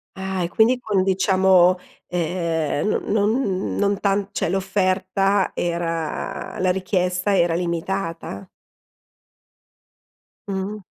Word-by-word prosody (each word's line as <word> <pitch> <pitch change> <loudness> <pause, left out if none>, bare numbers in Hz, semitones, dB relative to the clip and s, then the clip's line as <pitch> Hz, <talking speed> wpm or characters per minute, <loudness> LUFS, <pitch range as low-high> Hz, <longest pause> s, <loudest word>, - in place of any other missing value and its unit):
Ah, 190 -1 -3
e 170 - -2
quindi 230 +6 +3
quin 205 -6 0
diciamo, 190 -1 +4 0.3
ehm, 170 0 -1
no 205 -1 +2
non 200 -7 -1
non 200 0 +1
tan 200 0 +1
cioè - - -1
l'offerta 195 0 +1
era 165 -2 -3
la 185 0 +2
richiesta 185 +1 0
era 170 -1 +3
limitata. 170 - -3 2.0
Mh-mh. 200 +2 -4
190 Hz, 100 wpm, -22 LUFS, 175-195 Hz, 2.0 s, diciamo